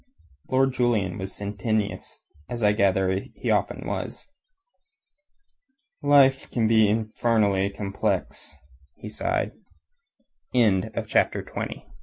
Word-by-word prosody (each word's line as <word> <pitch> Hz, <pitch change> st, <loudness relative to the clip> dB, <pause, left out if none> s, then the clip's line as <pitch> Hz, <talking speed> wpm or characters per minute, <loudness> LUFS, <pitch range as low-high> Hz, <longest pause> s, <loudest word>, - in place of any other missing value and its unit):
Lord 135 Hz, 0 st, +3 dB
Julian 115 Hz, -8 st, 0 dB
was 95 Hz, 0 st, -5 dB
sententious, 105 Hz, +1 st, -3 dB, 0.3 s
as 120 Hz, -2 st, -4 dB
I 105 Hz, -, +5 dB
gather 95 Hz, -2 st, +2 dB
that 95 Hz, -, -4 dB
he -, -, -2 dB
often -, -, 0 dB
was. -, -, -5 dB, 1.7 s
"Life 140 Hz, -2 st, +4 dB
can 115 Hz, -3 st, +1 dB
be 110 Hz, -2 st, +5 dB
infernally 110 Hz, -2 st, +1 dB
complex," 100 Hz, -5 st, -3 dB, 0.4 s
he 105 Hz, -, -9 dB
sighed. 110 Hz, -, -1 dB, 1.0 s
CHAPT 105 Hz, -7 st, +2 dB
105 Hz, 95 wpm, -25 LUFS, 100-120 Hz, 1.7 s, I